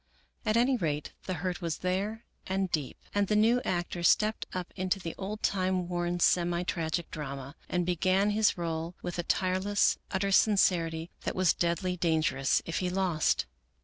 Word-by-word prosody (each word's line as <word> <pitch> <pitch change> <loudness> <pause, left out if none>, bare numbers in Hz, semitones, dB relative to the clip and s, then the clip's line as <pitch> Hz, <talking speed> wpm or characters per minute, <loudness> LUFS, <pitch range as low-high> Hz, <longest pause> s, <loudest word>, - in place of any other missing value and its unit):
At 215 +1 +3
any 250 +2 +3
rate 150 -7 -2
the 185 - -2
hurt 180 +3 -3
was 165 -3 -2
there 205 +5 -1 0.2
and 190 -1 -1
deep, 150 -4 -2 0.2
and 205 -1 +2
the 210 - +1
new 230 +4 +4
actor 175 -1 -2
stepped 215 +5 +3
up 180 -1 -5
into 185 +1 -1
the 170 -3 -5
old 210 +3 -5
time 185 -2 +1
worn, 175 0 -1
semi 175 0 +2
tragic 170 -1 -2
drama, 140 -2 -6
and 180 -1 0
began 185 +3 +2
his 210 -1 +2
role 165 0 -3
with 175 0 -4
a - - +3
tireless, 190 +3 +1
utter 195 +1 0
sincerity 175 -5 +3
that - - -3
was 185 -2 +3
deadly 175 +2 -1
dangerous 155 -5 +1
if 165 - -2
he 180 - -1
lost. 180 - +1
180 Hz, 170 wpm, -30 LUFS, 170-195 Hz, 0.2 s, new